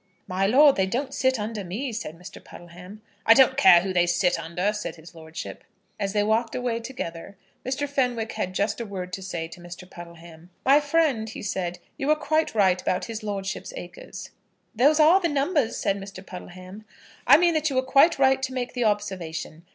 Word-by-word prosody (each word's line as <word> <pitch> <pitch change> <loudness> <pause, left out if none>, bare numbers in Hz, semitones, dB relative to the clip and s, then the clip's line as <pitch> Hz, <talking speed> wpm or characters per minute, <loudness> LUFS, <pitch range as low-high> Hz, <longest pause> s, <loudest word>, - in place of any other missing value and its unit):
"My 190 +1 0
lord, 280 +5 +6
they 190 -1 +2
don't 265 +6 -3
sit 260 -2 +1
under 210 -1 -4
me," 225 +8 -4
said 170 -7 -6
Mr. 180 - -12
Puddleham. 180 +5 -13 0.2
"I 225 - +7
don't 265 0 +5
care 175 -11 +7
who 190 +1 -3
they 175 -1 +3
sit 175 0 +1
under," 175 +5 -2
said 210 - -5
his 165 +1 -15
lordship. 160 -1 -9 0.4
As 200 -1 -2
they 205 -1 +2
walked 225 +2 0
away 245 -2 -2
together, 200 -7 -7 0.3
Mr. 270 +3 -2
Fenwick 245 -5 -1
had 185 0 -4
just 210 +4 -1
a - - -4
word 180 -2 -6
to 195 - -4
say 170 -4 -5
to 170 - -12
Mr. 175 +1 -10
Puddleham. 170 -1 -13 0.2
"My 275 +2 +6
friend," 290 -7 +1
he - - -8
said, 180 -3 -3 0.2
"you 275 - -3
were 305 - +4
quite 310 -2 -1
right 190 -3 +3
about 180 - -1
his 225 -1 -6
lordship's 200 - -5
acres." - - -9 0.4
"Those 285 +7 +3
are 330 +5 +6
the 340 - +1
numbers," 285 -3 0
said 200 0 -1
Mr. 195 -1 -10
Puddleham. 185 +3 -10 0.4
"I - - +9
mean 345 +1 +3
that 310 -1 +1
you 270 - -4
were 260 - +2
quite 275 +6 +4
right 265 -1 +3
to 260 0 -3
make 250 -1 -3
the 245 - -1
observation. 180 -6 -3
210 Hz, 200 wpm, -25 LUFS, 180-265 Hz, 0.4 s, I